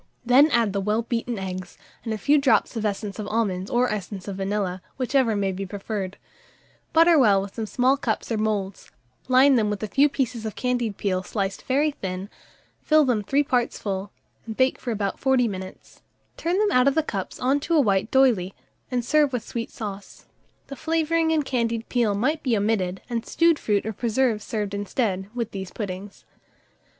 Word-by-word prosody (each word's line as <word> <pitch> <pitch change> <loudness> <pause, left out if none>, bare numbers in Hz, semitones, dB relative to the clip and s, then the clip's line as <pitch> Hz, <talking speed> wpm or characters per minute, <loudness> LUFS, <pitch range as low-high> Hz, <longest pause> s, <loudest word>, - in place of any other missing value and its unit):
Then 265 +5 +6
add 230 -7 +2
the 200 - -1
well 210 +3 0
beaten 235 0 -2
eggs, 185 -1 -6 0.3
and 225 - -4
a 220 - -1
few 290 +7 +3
drops 275 -2 +2
of 225 - -2
essence 205 0 -4
of 210 - -4
almonds 205 -4 -1
or 245 +1 +2
essence 200 -2 -5
of 195 -1 -5
vanilla, 195 -2 -2 0.2
whichever 255 -3 +1
may 195 -1 0
be 190 +1 -4
preferred; 195 0 -5 0.7
butter 330 0 +6
well 200 -5 +4
some 220 +2 -5
small 260 +4 +2
cups 230 -3 -2
or 225 - +1
moulds, 205 -3 -2 0.4
line 260 +1 +5
them 215 -2 +2
with 210 0 -3
a - - -1
few 280 +7 +3
pieces 250 -5 -2
of 220 -2 -5
candied 245 -5 -1
peel 185 -2 -1
sliced 195 0 -3
very 290 +4 +2
thin, 190 -5 -6 0.5
fill 310 -1 +4
them 240 -5 +1
three 275 +8 +1
parts 250 -3 0
full, 195 0 -4 0.4
and 220 - -6
bake 260 0 +2
for 250 - -6
about 205 -3 -2
40 265 -2 +3
minutes; 190 -2 -8 0.3
turn 345 +2 -1
them 420 0 +2
out 250 +1 +4
of 275 - +3
the 320 - +2
cups 195 -10 -5
on 270 +3 +2
to 335 +4 -1
a - - +5
white 205 -4 +2
d'oyley, 235 -9 +3 0.3
and 245 -2 -1
serve 300 0 +3
with 245 -3 -3
sweet 230 -1 -4
sauce. 205 -5 -8 0.4
The 275 - -8
flavouring 325 +1 +1
and 310 -3 +1
candied 230 -3 -1
peel 230 -5 +1
might 295 +9 0
be 240 -5 +1
omitted, 200 -3 0
and 235 -2 -2
stewed 335 +2 +2
fruit 205 -2 0
or 220 - -3
preserve 230 0 0
served 210 -2 -3
instead, 200 -1 -2
with 235 -2 -3
these 190 -2 -6
puddings. 200 -1 -7
225 Hz, 190 wpm, -24 LUFS, 200-260 Hz, 0.7 s, Then